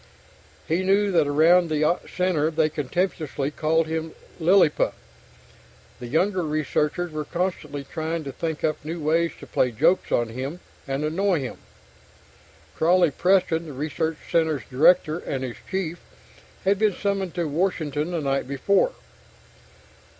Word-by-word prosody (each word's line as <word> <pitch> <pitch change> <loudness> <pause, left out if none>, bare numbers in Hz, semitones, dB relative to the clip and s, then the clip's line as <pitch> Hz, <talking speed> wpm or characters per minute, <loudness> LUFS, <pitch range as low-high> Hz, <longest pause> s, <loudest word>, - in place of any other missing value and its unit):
He 165 +4 +1
knew 200 +2 +2
that 165 -5 +3
around 165 +4 +4
the 155 +3 +2
center 180 -4 +1
they 160 -1 +1
contemptuously 150 -2 -2
called 160 +2 +1
him 160 0 -4 0.2
"Lilliput." 175 -2 +3 1.0
The 120 - -7
younger 180 +8 +1
researchers 155 +2 -1
were 155 0 -3
constantly 170 -4 -3
trying 160 +3 -4
to 140 - -5
think 160 +3 -4
up 155 -1 -1
new 165 +3 -5
ways 165 +2 +1
to - - -10
play 125 - +1
jokes 160 - +2
on 120 -1 +1
him, 135 +8 -5 0.3
and 135 +2 -1
annoy 180 +1 +1
him. 130 - -6 1.2
Crawley 175 0 +4
Preston, 170 -1 +2
the 150 - -7
research 155 +3 -2
center's 160 -4 +1
director 155 +4 +4
and 135 -5 -4
his 125 -2 -5
chief, 180 -3 -3 0.7
had 195 +1 +3
been 210 -3 +2
summoned 195 -3 -2
to 170 -2 -1
Washington 155 -2 -1
the 170 -3 -2
night 135 -2 -1
before. 195 - +2
160 Hz, 140 wpm, -24 LUFS, 150-180 Hz, 1.2 s, around